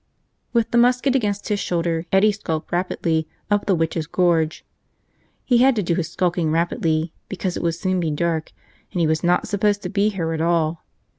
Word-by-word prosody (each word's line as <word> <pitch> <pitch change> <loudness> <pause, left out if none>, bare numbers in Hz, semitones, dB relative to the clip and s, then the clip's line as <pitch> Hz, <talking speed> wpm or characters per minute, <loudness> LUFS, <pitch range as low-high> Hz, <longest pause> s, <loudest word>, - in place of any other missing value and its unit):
With 235 -2 +1
the 235 - +4
musket 250 +2 +3
against 205 -5 -1
his 205 -1 0
shoulder, 170 -2 -1
Eddie 195 +3 +5
skulked 165 -7 -4
rapidly 170 -3 0 0.2
up 205 0 +1
the 195 - +3
Witches' 160 -1 -1
Gorge. 165 -3 +1 0.8
He 245 -2 +3
had 265 +1 +5
to 210 - 0
do 170 - 0
his 165 -2 -2
skulking 175 -2 0
rapidly 160 0 0 0.2
because 185 -2 -3
it - - -3
would 170 -1 0
soon 185 +2 -1
be 165 -2 0
dark 160 +1 -1 0.4
and 180 - -3
he 170 - +3
was 155 0 0
not 175 +1 +2
supposed 205 0 +1
to 180 - -3
be 205 +2 +2
here 170 -5 -2
at 160 - -2
all. 165 -1 +1
175 Hz, 195 wpm, -22 LUFS, 165-205 Hz, 0.8 s, Eddie